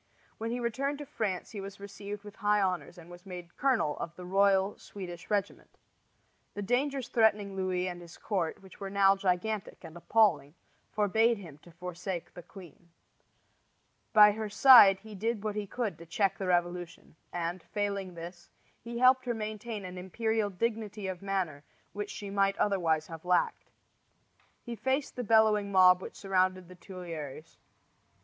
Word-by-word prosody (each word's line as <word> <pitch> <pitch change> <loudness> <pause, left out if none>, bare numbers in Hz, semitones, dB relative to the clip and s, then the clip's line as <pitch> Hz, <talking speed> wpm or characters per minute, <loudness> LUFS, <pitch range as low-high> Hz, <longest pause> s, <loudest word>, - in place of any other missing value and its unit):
When 225 +1 -3
he 240 +1 -2
returned 265 +5 -1
to 290 - -7
France 200 -8 -3
he 205 - -6
was 195 +1 -9
received 200 +1 -8
with 205 0 -12
high 210 -1 +2
honors 185 -2 -1
and 170 -1 -12
was 175 0 -12
made 180 -3 -9
colonel 250 - +1
of 170 0 -5
the 180 - -9
royal 195 +1 +3
Swedish 180 -3 -9
regiment. 205 -2 -3 0.8
The 205 - -4
dangers 260 +4 0
threatening 210 -3 +2
Louis 185 -1 -1
and 175 -1 -6
his 170 -1 -12
court, 185 -3 -2
which 190 - -15
were 195 - -5
now 195 0 +4
gigantic 195 +2 -2
and 165 -1 -10
appalling, 170 -6 +2 0.4
forbade 220 +3 +2
him 165 -7 -11
to 175 - -17
forsake 180 +1 -6
the 175 - -9
queen. 175 -2 -14 1.2
By 210 -1 +8
her 215 0 -4
side 205 -4 +8
he 220 0 -11
did 215 +1 -2
what 215 -1 -2
he 210 -1 -3
could 230 -3 -3
to 170 - -12
check 195 +3 0
the 190 - -3
revolution; 175 -2 -2 0.2
and, 175 +1 -3
failing 200 -1 -3
this, 175 +1 -9 0.3
he 235 0 -6
helped 255 +1 +5
her 240 - 0
to - - -6
maintain 215 -1 -5
an 180 0 -7
imperial 220 +3 -1
dignity 215 +1 -3
of 185 -1 -4
manner 185 -7 -2 0.3
which 205 0 -4
she 200 -1 -7
might 195 0 +2
otherwise 165 -6 +1
have 165 -1 -9
lacked. 180 0 0 0.9
He 240 -1 -6
faced 265 +5 -1
the 245 - -3
bellowing 215 -2 +3
mob 185 -1 +6
which - - -8
surrounded 185 -2 0
the 185 - -12
Tuileries. 165 -4 -8
195 Hz, 170 wpm, -30 LUFS, 180-215 Hz, 1.2 s, By